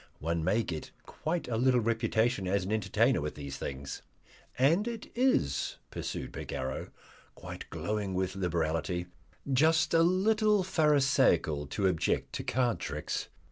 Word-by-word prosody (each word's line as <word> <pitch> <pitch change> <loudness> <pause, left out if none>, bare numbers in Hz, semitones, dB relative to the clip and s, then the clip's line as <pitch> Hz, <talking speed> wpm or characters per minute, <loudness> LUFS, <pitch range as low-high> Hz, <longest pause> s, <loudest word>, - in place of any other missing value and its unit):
One 85 +1 -1
may 100 +7 +2
get 80 -6 -5 0.2
quite 165 +2 -3
a 115 -2 -1
little 125 +1 +4
reputation 115 -2 +1
as 95 0 +1
an 100 - -4
entertainer 110 - +2
with 75 +1 -4
these 70 -2 -6
things." 70 0 -5 0.6
"And 165 - +3
it 230 -2 -6
is," 240 - +1
pursued - - -4
Bagarrow, 65 0 -4 0.5
quite - - -9
glowing 105 -3 -2
with 95 0 -1
liberality, 85 -1 -1 0.5
"just 155 +4 +3
a 165 - +6
little 210 +3 +3
pharisaical 135 - +3
to 100 +7 -2
object 90 -4 0
to - - -3
card 125 -3 +1
tricks. - - -3
110 Hz, 140 wpm, -30 LUFS, -, 0.6 s, a